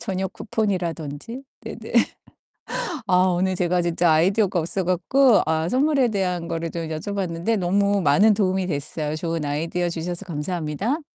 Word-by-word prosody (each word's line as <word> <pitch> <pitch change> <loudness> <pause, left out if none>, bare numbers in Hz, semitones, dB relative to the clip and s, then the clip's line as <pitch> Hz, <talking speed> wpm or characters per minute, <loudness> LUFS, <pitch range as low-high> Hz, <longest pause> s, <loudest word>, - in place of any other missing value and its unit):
저녁 190 -3 -3
쿠폰이라든지. 185 - -3 0.2
네네. - - -8 1.2
아 185 - +3 0.2
오늘 185 +1 +1
제가 180 0 +1
진짜 170 0 +2
아이디어가 185 +4 +3
없어 175 +4 -2
갖고 210 +8 +4
아 160 +1 +1
선물에 270 +1 +2
대한 180 -5 -1
거를 165 0 -3
좀 165 0 -4
여쭤봤는데 180 +4 -2
너무 200 +2 +2
많은 190 +8 +5
도움이 190 -2 +1
됐어요. 150 0 -3
좋은 165 0 -2
아이디어 165 +4 -1
주셔서 170 +3 -4
감사합니다. 175 - -2
180 Hz, 345 characters per minute, -23 LUFS, 165-200 Hz, 1.2 s, 많은